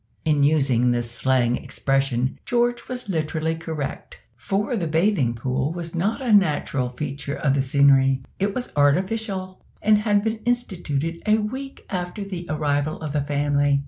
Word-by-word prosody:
In 150 -2 +3
using 135 -5 +3
this 120 -1 0
slang 125 -1 +2
expression 135 -1 -1
George 240 0 0
was 250 -3 -5
literally 160 -2 -1
correct, 160 -3 -5 0.2
for 205 +5 -1
the 175 -7 -1
bathing 160 - +2
pool 130 +4 -1
was 170 -1 -6
not 200 - -1
a 235 -4 +2
natural 145 -9 +2
feature 140 +2 -5
of 135 -2 +1
the 140 - +2
scenery: 135 -1 +4 0.2
it 200 +1 0
was 250 - -3
artificial, 185 +6 0 0.2
and 210 0 +4
had 205 -1 +2
been 220 0 -1
instituted 170 - -2
a 215 +1 +5
week 260 +6 -5
after 180 +2 -3
the 180 -3 -6
arrival 150 0 0
of 155 -2 -5
the 150 - +1
family. 145 0 +1
155 Hz, 155 wpm, -23 LUFS, 140-200 Hz, 0.2 s, a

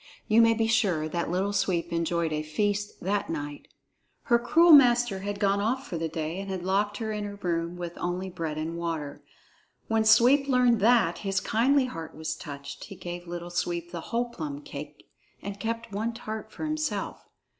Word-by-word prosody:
You 220 +2 +5
may 230 0 +5
be 225 0 +1
sure 195 -9 +2
that 170 +1 -2
Little 190 +4 0
Sweep 170 -3 0
enjoyed 170 -1 0
a 150 - -1
feast 205 +7 -2
that 200 +2 -1
night. 145 -2 -5 0.6
Her 235 -1 +3
cruel 330 +9 +5
master 240 -7 +6
had 200 +1 -4
gone 200 -1 +2
off 255 +6 -1
for 170 - -4
the 165 - -1
day 160 +2 -3
and 195 0 -6
had 185 -2 -4
locked 205 +2 +1
her 220 -1 -3
in 210 -1 -3
her 205 0 -5
room 170 -2 -2
with 175 -1 -6
only 180 +2 -2
bread 165 -4 -4
and 160 +2 -3
water. 160 -4 -4 0.7
When 225 0 +2
Sweep 255 +6 +5
learned 250 -3 +4
that, 220 -5 +4
his 195 -1 0
kindly 260 +5 +2
heart 165 -10 -7
was 155 0 -3
touched; 140 -3 -8
he 195 - -10
gave 175 -1 -7
Little 175 0 -6
Sweep 175 -1 -2
the 170 -2 -5
whole 240 +7 -2
plum 150 -10 -6
cake 145 +1 -9 0.3
and 200 0 -7
kept 230 0 -3
but - - -7
one 225 +3 -1
tart 220 -1 -6
for - - -5
himself. 310 0 -2
195 Hz, 195 wpm, -27 LUFS, 170-225 Hz, 0.7 s, master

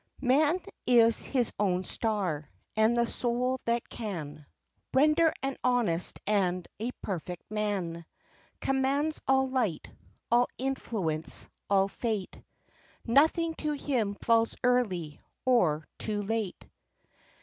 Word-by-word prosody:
"Man 295 +7 +4 0.3
is 230 -2 +5
his 250 -4 0
own 185 -3 +1
star, 185 -10 -1 0.3
and 220 +2 +3
the 235 - +4
soul 250 +2 -1
that 235 0 0
can 155 -9 -6 0.5
Render 305 +4 +5
an 270 0 -1
honest 235 -9 +1
and 185 -4 +1
a 230 +3 -2
perfect 180 -1 -5
man, 190 -6 -2 0.5
Commands 275 +3 +1
all 265 0 +4
light, 245 -10 -1 0.4
all 240 +1 +5
influence, 215 -12 -2 0.2
all 195 -1 +4
fate, 210 -2 -3 0.6
Nothing 320 +7 +3
to 300 -1 -1
him 245 -8 -1
falls 230 +1 +2
early, 190 - +1 0.2
or 175 -12 +3
too 210 -1 -2
late. 215 -2 -3
225 Hz, 110 wpm, -29 LUFS, 185-260 Hz, 0.6 s, is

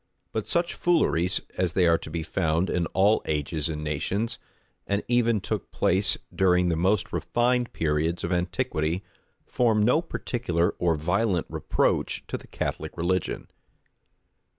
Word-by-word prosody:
But 110 - -3
such 170 0 +1
fooleries, 90 - +2 0.2
as 90 -3 +1
they 90 0 +3
are 85 -1 +4
to - - -8
be 80 +1 -3
found 80 +1 0
in 85 -1 0
all 100 +3 +3
ages 75 +1 -1
and 75 -1 -4
nations, 85 +9 -2 0.5
and 100 +1 0
even 115 -2 +2
took - - -4
place 95 +2 +2 0.2
during 90 -1 +3
the 85 - +1
most 95 +4 +1
refined 120 +9 +1
periods 80 +2 0
of 85 - -2
antiquity, 85 0 -1 0.4
form 110 -4 +2
no 125 +9 +4
particular 110 - -1
or 85 -2 +2
violent 90 +3 0
reproach - - 0
to - - -2
the - - -15
Catholic 80 +2 -4
religion. 90 +1 -1
90 Hz, 145 wpm, -26 LUFS, 80-105 Hz, 0.5 s, are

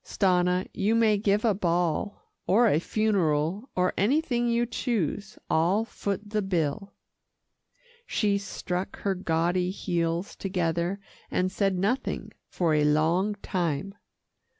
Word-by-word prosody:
"Stanna 180 -1 +1
you 215 +3 +1
may 225 -2 +4
give 205 +2 +1
a 220 - +4
ball, 175 0 -1 0.2
or 230 +6 +5
a 155 - +3
funeral, 190 - 0
or 180 0 +1
anything 240 - +1
you 235 0 +2
choose. 210 - -2
I'll 180 +7 +2
foot 205 -2 -4
the 215 -1 +1
bill." 190 +1 -2 1.1
She 200 -2 +1
struck 185 -1 -4
her 200 - +1
gaudy 175 0 0
heels 170 -1 -2
together, 175 0 -1 0.3
and 185 0 0
said 195 -1 0
nothing 210 +8 -1 0.2
for 170 -3 0
a 150 -1 +3
long 165 +7 +2
time. 175 +1 -2
190 Hz, 125 wpm, -27 LUFS, 170-210 Hz, 1.1 s, or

